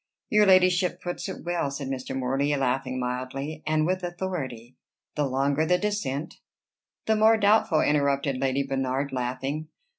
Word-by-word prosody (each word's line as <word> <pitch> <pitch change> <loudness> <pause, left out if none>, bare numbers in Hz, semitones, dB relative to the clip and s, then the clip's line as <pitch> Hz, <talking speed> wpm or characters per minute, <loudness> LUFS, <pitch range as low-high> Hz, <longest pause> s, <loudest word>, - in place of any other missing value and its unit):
"Your 210 -1 +5
ladyship 185 -1 +4
puts 175 +2 -5
it 190 - -7
well," 175 -4 -1
said 140 0 -5
Mr. 130 0 -4
Morley, 135 +3 0
laughing 130 -1 -1
mildly, 130 +5 -4
"and 155 0 +2
with 185 +2 0
authority. 170 -10 -5 0.4
The 150 -2 0
longer 140 +3 +1
the 180 +3 +3
descent" 180 -8 -3 0.7
"The 220 - +3
more 220 +1 +5
doubtful," 205 -6 +3
interrupted 140 -2 +1
Lady 135 +1 0
Bernard, 135 0 -2
laughing. 135 +4 -3
140 Hz, 145 wpm, -26 LUFS, 135-180 Hz, 0.7 s, Your